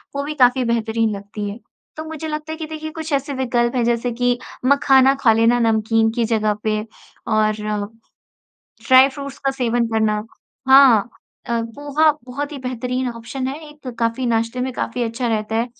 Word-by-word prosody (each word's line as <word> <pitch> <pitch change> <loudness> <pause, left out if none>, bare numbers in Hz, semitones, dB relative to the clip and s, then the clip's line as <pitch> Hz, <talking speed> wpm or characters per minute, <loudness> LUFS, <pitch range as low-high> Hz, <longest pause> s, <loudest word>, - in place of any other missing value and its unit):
वो 280 - -1
भी 295 +2 -4
काफ़ी 255 -1 +4
बेहतरीन 225 -2 0
लगती 205 +1 -6
है। 205 +3 -8 0.4
तो 315 - -4
मुझे 315 0 -6
लगता 305 0 -5
है 315 - -5
कि 320 - -5
देखिए 315 0 -6
कुछ 320 0 -7
ऐसे 280 +1 -1
विकल्प 240 -2 0
हैं, 245 - +1
जैसे 240 +1 0
कि 245 +1 0 0.3
मखाना 270 -1 +5
खा 230 - +5
लेना 230 +2 +3
नमकीन 225 0 +2
की 235 +1 -1
जगह 215 -2 +1
पे 215 -1 0 0.5
और 215 -1 +2 1.4
ड्राई-फ्रूट्स 270 +1 +4
का 270 - +3
सेवन 240 -3 0
करना। 215 -1 +1 0.5
हाँ। 260 -5 +7 0.4
अ, 235 -1 -1
पोहा 290 +6 +1
बहुत 285 +4 -5
ही 295 - -6
बेहतरीन 250 0 -3
ऑप्शन 235 +3 -5
है। 270 +2 -4
एक 295 -3 -14
काफ़ी 230 +2 0
नाश्ते 230 +1 -1
में 260 +1 -2
काफ़ी 245 0 -3
अच्छा 235 +2 -3
रहता 220 -1 -1
है। 230 +1 +1
245 Hz, 175 wpm, -20 LUFS, 225-275 Hz, 1.4 s, हाँ